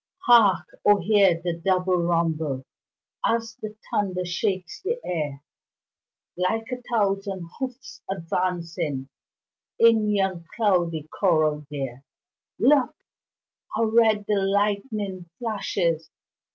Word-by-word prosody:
Hark! 220 -6 +6 0.2
O 205 0 +5
hear 195 -3 +4
the 175 -1 0
double 185 +1 +1
rumble 160 -5 0 0.6
As 225 -1 0
the 215 0 -6 0.2
thunder 185 -3 -1
shakes 185 0 -2
the 460 +5 -2
air, 145 -5 -3 0.9
Like 220 +7 -1
a 250 0 -4
thousand 195 -4 0
hoofs 260 -1 -6
advancing 165 -6 -2 0.7
In 225 -2 +5
yon 190 -4 0
cloudy 175 -8 +1
corral 155 -5 +1
there! 135 -3 -5 0.5
Look! 270 +2 +3 0.8
how 230 - +1
red 220 -2 +3
the 205 -2 +2
lightning 200 -2 -1
flashes! 195 -8 -1
190 Hz, 100 wpm, -25 LUFS, 170-215 Hz, 0.9 s, Hark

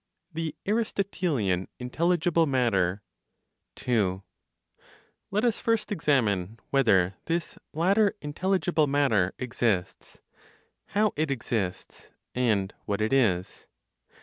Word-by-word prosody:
THE 160 -1 -3
ARISTOTELIAN 180 - 0
INTELLIGIBLE 165 +5 +1
MATTER. 105 -8 +1 0.7
2. 100 -6 0 1.1
Let 210 +4 0
us 235 -2 +1
first 225 -2 0
examine 115 - +1
whether 100 -9 +3
this 170 0 -2
(latter 195 +6 +2
intelligible) 170 0 0
matter 130 -10 +2
exists, 120 -7 -2 0.7
how 210 +1 +1
it 155 0 0
exists, 110 -8 -3 0.2
and 110 -6 +1
what 100 0 -1
it 110 +3 0
is. 95 -9 +1
135 Hz, 95 wpm, -27 LUFS, 100-170 Hz, 1.1 s, whether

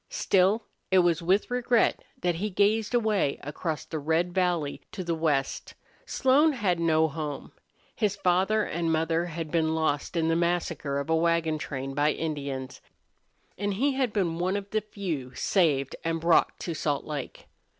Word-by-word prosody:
Still, 200 +4 +2 0.2
it 190 - +4
was 175 -2 +3
with 190 +7 +1
regret 245 -1 +2 0.2
that 175 -1 +1
he 210 +5 -2
gazed 210 +4 +2
away 215 -11 +1
across 150 +2 -4
the 160 - -4
red 165 +4 0
valley 175 -6 0
to 185 - -4
the 170 -1 -1
west. 150 -4 -1 0.3
Slone 285 +4 +3
had 195 -9 0
no 160 -1 +3
home. 150 -2 -5 0.4
His 205 -3 0
father 195 +3 +2
and 165 -3 -1
mother 165 +1 +1
had 165 -2 -5
been 160 -1 +1
lost 160 +1 -1
in 160 -1 +2
the 165 - +2
massacre 170 -4 -1
of 140 +3 -2
a - - +4
wagon 165 -1 +1
train 135 -2 -5
by 145 +2 +2
Indians, 140 -4 -4 0.8
and 205 -1 -1
he 275 +7 +1
had 260 -3 0
been 175 -6 -1
one 185 +3 0
of 200 0 -7
the 215 - +1
few 175 -11 -5
saved 145 -8 +1
and 165 0 -1
brought 165 +1 +3
to 170 - -3
Salt 145 -2 -1
Lake. 145 -4 -6
170 Hz, 170 wpm, -27 LUFS, 155-195 Hz, 0.8 s, it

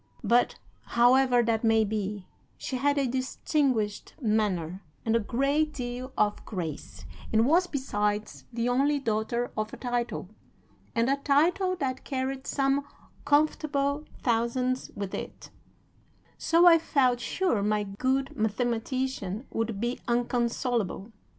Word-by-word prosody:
But, 240 +1 +3 0.4
however 245 0 +5
that 225 0 0
may 225 -1 +4
be, 205 -2 -3 0.3
she 260 - -4
had 285 +3 +1
a 275 - +2
distinguished 255 -3 -1
manner 200 - 0 0.2
and 225 0 +2
a - - +4
great 280 +7 0
deal 250 0 -5
of 210 0 +1
grace, 165 -7 -6 0.3
and 225 +1 +4
was, 345 +7 +4
besides, 210 -8 -2
the 235 0 -1
only 275 +4 +2
daughter 235 -1 -1
of 215 0 -2
a - - -6
title, 240 -5 -2 0.7
and 230 +1 +2
a 275 +1 +2
title 340 +7 +2
that 260 -5 -3
carried 265 0 -3
some 275 0 +1 0.4
comfortable 290 -1 +1 0.2
thousands 250 +2 0
with 200 -2 -5
it; - - -7 0.8
so 335 +2 +3
I 335 -2 +8
felt 255 -6 +2
sure 245 - 0
my 210 +1 +1
good 260 +7 -1
mathematician 235 0 -2
would 225 -2 -2
be 240 +3 -2
inconsolable. 235 -3 -1
245 Hz, 125 wpm, -28 LUFS, 220-275 Hz, 0.8 s, I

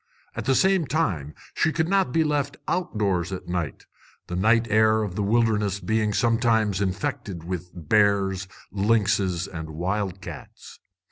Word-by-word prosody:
At - - -5
the 135 +2 +3
same 190 -3 +3
time 95 - -1 0.2
she 160 - +1
could 160 0 0
not 195 -7 +2
be 165 +3 +3
left 145 -2 -1
outdoors 100 - -1
at 95 - -6
night, 85 -5 -3 0.4
the 90 - -5
night 110 +5 +3
air 110 0 +4
of 100 -4 -4
the 105 - -2
wilderness 105 -2 +1
being 110 0 0
sometimes 115 -3 +2
infected 95 -2 -3
with 90 0 -5
bears, 95 +2 +2 0.2
lynxes, 100 -3 +1
and 80 -3 -7
wild 95 +4 -2
cats. 80 -8 -10
105 Hz, 145 wpm, -25 LUFS, 90-115 Hz, 0.4 s, air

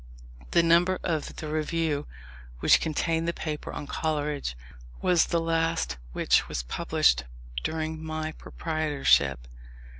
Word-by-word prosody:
The 170 - +4
number 175 +3 +4
of 160 -4 -2
the 155 - -6
Review 155 -1 -1 0.5
which - - +5
contained 165 +1 0
the 170 - +1
paper 155 -3 -4
on - - -5
Coleridge, 145 - -2 0.4
was 175 -2 +3
the 170 - +1
last 165 - 0
which - - +2
was - - -2
published 60 0 +2 0.4
during 160 0 -3
my 155 0 -3
proprietorship. 145 - +1
155 Hz, 120 wpm, -27 LUFS, 145-165 Hz, 0.5 s, which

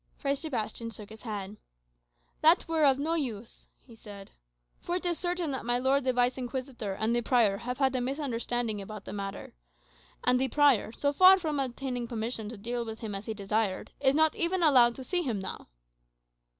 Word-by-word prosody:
Fray 275 -1 0
Sebastian 245 -6 -3
shook 210 -2 -8
his 220 - -11
head. 205 -3 -6 0.8
"That 325 +4 +5
were 320 -2 +2
of 270 -2 +5
no 310 +4 -1
use," 240 -9 -4
he 240 - -18
said; 205 -3 -12 0.5
"for 350 - -3
it 365 - -3
is 345 -2 0
certain 350 -3 -2
that 265 - -3
my 240 +1 +1
lord 265 +2 +1
the 260 - +3
Vice 250 +1 +1
Inquisitor 250 -5 -4
and 220 +3 0
the 240 - +1
prior 225 -5 +3
have 250 +3 -5
had 265 -1 +1
a 255 - 0
misunderstanding 245 -5 -2
about 205 0 -9
the - - -7
matter. 195 -1 -6 0.7
And 250 0 +3
the 265 - +2
prior, 275 -5 +3
so 285 +4 -1
far 370 +5 +8
from 310 -6 -2
obtaining 250 -2 -3
permission 225 -1 -3
to 235 - -8
deal 235 +4 -3
with 220 0 -7
him 220 -3 -5
as 195 +1 -6
he 220 - -3
desired, 205 -1 -1
is 270 0 +3
not 315 0 +4
even 345 +1 0
allowed 245 -6 +6
to 265 - -8
see 355 +6 0
him 245 -10 -2
now." 190 0 -6
245 Hz, 200 wpm, -29 LUFS, 220-285 Hz, 0.8 s, far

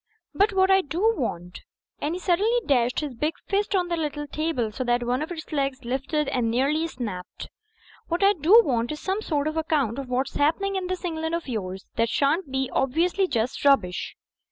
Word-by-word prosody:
But 405 +2 +3
hwhat 380 -1 +3
I 385 0 +6
do 370 +9 +1
want 180 - -4
— - - -69
" - - -52
and 305 +4 -1
he - - -4
suddenly 405 +7 +2
dashed 250 -2 +2
his 295 -3 -4
big 300 +7 -2
fist 405 0 0
on 360 -2 +1
the 345 - -1
little 295 -2 -3
table 295 -7 -2
so 255 - -3
that 240 0 +1
one 250 +3 0
of 315 - -4
its 325 -1 -7
legs 275 -2 -1
le^t 270 +5 -1
and 240 -3 0
nearly 280 +7 +1
snapped 210 - -6 0.3
— - - -27
"hwhat 345 +3 0
I 400 +1 +6
do 380 +7 +6
want 240 -1 0
is 305 - -5
some 385 +5 -2
sort 300 -7 -1
of 310 +1 -3
account 285 -7 0
of 270 -2 -6
what's 255 +2 -1
happening 390 +7 +1
in 375 -1 -2
this 370 0 -4
England 320 -1 -2
of 335 - -5
yours 190 -6 -4
that 230 0 +2
shan't 290 +4 +1
be 265 0 0
just - - -10
obviously 345 +8 +1 0.4
rubbish." 230 -11 +2
300 Hz, 215 wpm, -25 LUFS, 250-350 Hz, 0.4 s, I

